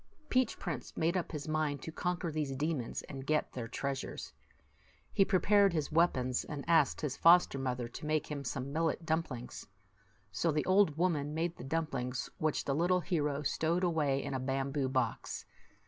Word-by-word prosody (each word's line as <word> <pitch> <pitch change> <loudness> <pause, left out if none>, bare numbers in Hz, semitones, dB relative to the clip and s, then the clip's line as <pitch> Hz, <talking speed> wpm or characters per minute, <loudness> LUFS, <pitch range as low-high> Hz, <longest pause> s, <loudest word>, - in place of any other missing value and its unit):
Peach 255 -2 +2
Prince 160 -9 -5
made 165 +3 +1
up 180 - -1
his 150 -3 -5
mind 155 -3 -1
to 160 - -5
conquer 175 0 -2
these 150 -3 -2
demons 145 -3 -2
and 135 -2 -7
get 155 0 +1
their 120 -3 -4
treasures. 135 +2 -4 0.8
He 195 - +5
pre 195 -1 +2
pared 200 0 +4
his 155 -2 -1
weapons, 130 -7 +2
and 145 -3 -6
asked 165 -4 +4
his 145 -3 -2
foster 170 -4 +5
mother 125 -2 -2
to 135 +6 -8
make 155 0 +1
him 145 -2 -5
some 135 +1 -4
millet 165 +1 0
dumplings. 155 -7 -3 0.6
So 100 - +1
the 150 0 0
old 185 -5 +4
woman 155 -4 0
made 170 +1 -1
the - - -9
dumplings, 135 -4 -2
which 155 -1 0
the 140 - 0
little 175 +4 +2
hero 150 -5 -1
stowed 165 +5 0
away 150 -6 +1
in - - -4
a 130 - -1
bamboo 135 +1 -1
box. 130 -3 -2
150 Hz, 180 wpm, -33 LUFS, 135-170 Hz, 0.8 s, He